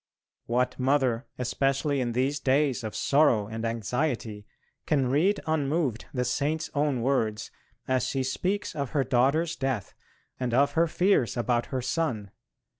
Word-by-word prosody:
What 125 +2 0
mother, 130 -2 +1
especially 135 +2 0
in 120 -2 -1
these 135 +4 0
days 135 -1 +1
of 110 - -5
sorrow 140 -8 +3
and 110 +2 -6
anxiety, 115 -1 -2 0.4
can 135 -4 +2
read 185 +9 +2
unmoved 150 -5 0
the 125 -2 -1
Saint's 150 +5 -1
own 145 -5 0
words 115 -5 0 0.4
as 130 0 +1
she 135 0 -1
speaks 185 +10 -2
of 140 -3 -2
her 135 - +3
daughter's 140 +7 +2
death, 135 -7 -2 0.5
and 125 -2 -1
of 140 +2 +4
her 165 +1 +2
fears 170 - +2
about 120 0 0
her 130 -2 -3
son. 125 - -2
130 Hz, 145 wpm, -27 LUFS, 120-145 Hz, 0.5 s, of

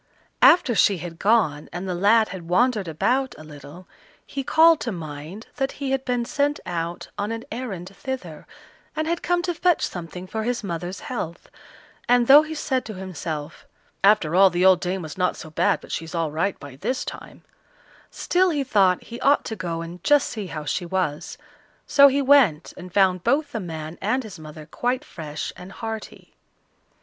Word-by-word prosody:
After 345 -9 +6
she 200 -1 +3
had 165 0 -8
gone, 195 -9 +2
and 180 +2 -5
the 185 - -2
lad 210 +5 +3
had 180 -3 -8
wandered 215 0 +2
about 250 - 0
a 155 - -11
little, 155 +4 -12 0.4
he 275 - -5
called 320 +3 +5
to 235 - -3
mind 160 +4 -8
that 270 0 -1
he 275 -2 -4
had 270 -1 0
been 245 -2 -1
sent 290 +1 0
out 170 -1 -4
on 205 +2 -2
an 230 0 -4
errand 195 -6 -6
thither, 195 - -6 0.5
and 310 - -1
had 340 +1 -1
come 350 0 0
to 350 - -1
fetch 350 0 +2
something 180 +1 -7
for 220 +4 -4
his 240 +1 -2
mother's 175 0 -5
health; 170 -9 -6 0.6
and 245 0 +5
though 280 +4 +9
he 310 +1 -6
said 260 -4 -1
to 215 - -7
himself, 165 -5 -6 0.4
"After 195 -6 +4
all 190 +2 +7
the 180 +1 +1
old 185 -2 +6
dame 180 0 -3
was 155 +4 -8
not 180 - +1
so 155 - -10
bad - - +1
but - - -12
she's 165 +2 -5
all 165 -2 -1
right 170 +6 -1
by 140 -2 -11
this 255 - -2
time" - - -9 0.7
still 370 +1 +1
he 295 -4 0
thought 195 -8 +2
he 235 +1 -9
ought 285 +1 +3
to 220 - -4
go 170 -4 -4
and 170 +1 -10
just 290 -1 +4
see 210 -5 -5
how 155 -3 -6
she 180 - -2
was. 170 -4 -3 0.5
So 280 -1 +7
he 280 +1 +1
went 255 - +4
and 180 0 -10
found 185 -2 +3
both 290 +1 +1
the 225 - -3
man 160 -3 -7
and 240 +7 0
his 205 -6 -10
mother 155 0 -10
quite 245 +10 -2
fresh 150 -2 -6
and 180 +2 -11
hearty. 220 +1 -7
195 Hz, 190 wpm, -23 LUFS, 170-255 Hz, 0.7 s, though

